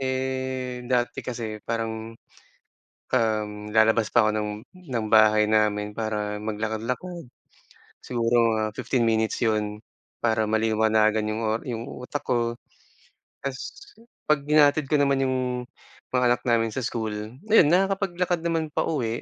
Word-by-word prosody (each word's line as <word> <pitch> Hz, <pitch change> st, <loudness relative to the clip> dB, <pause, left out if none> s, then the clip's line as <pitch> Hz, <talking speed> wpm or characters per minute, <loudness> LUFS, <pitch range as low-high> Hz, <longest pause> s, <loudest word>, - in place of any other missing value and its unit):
eh, 130 Hz, -1 st, -2 dB
dati 120 Hz, -1 st, 0 dB
kasi 110 Hz, -4 st, -5 dB
parang, 115 Hz, 0 st, -4 dB, 1.0 s
um, 110 Hz, -4 st, +1 dB, 0.2 s
lalabas 110 Hz, 0 st, +4 dB
pa 120 Hz, -, +5 dB
ako -, -, +3 dB
ng 105 Hz, -, -2 dB, 0.4 s
ng 120 Hz, -4 st, -2 dB
bahay 110 Hz, -1 st, +6 dB
namin 105 Hz, -1 st, +1 dB
para 105 Hz, -2 st, -2 dB
maglakad-lakad, 115 Hz, +11 st, -3 dB, 0.8 s
siguro 115 Hz, -1 st, +2 dB
mga 110 Hz, -, 0 dB
15 130 Hz, -3 st, 0 dB
minutes 110 Hz, -1 st, +1 dB
'yon 105 Hz, -2 st, 0 dB, 0.4 s
para 110 Hz, -1 st, +2 dB
maliwanagan 110 Hz, 0 st, +2 dB
yung 110 Hz, +1 st, -2 dB
o 110 Hz, -, +1 dB, 0.2 s
yung 115 Hz, -3 st, -4 dB, 0.2 s
utak 125 Hz, +3 st, -5 dB
ko. 120 Hz, -1 st, 0 dB, 0.9 s
Tapos 135 Hz, -1 st, -3 dB, 0.7 s
'pag 150 Hz, -2 st, +2 dB
hinahatid 150 Hz, -1 st, +4 dB
ko 155 Hz, -, +3 dB
naman 140 Hz, -1 st, +2 dB
yung 130 Hz, 0 st, 0 dB, 0.7 s
mga 125 Hz, -1 st, +1 dB
anak 120 Hz, -, +1 dB
namin 115 Hz, -2 st, +2 dB
sa 130 Hz, -, -2 dB
school, 110 Hz, -2 st, -3 dB, 0.4 s
ayun 180 Hz, -9 st, +7 dB
nakakapaglakad 180 Hz, -1 st, +1 dB
naman 165 Hz, -2 st, -1 dB
pauwi. 120 Hz, -7 st, -1 dB
115 Hz, 130 wpm, -25 LUFS, 110-130 Hz, 1.0 s, ayun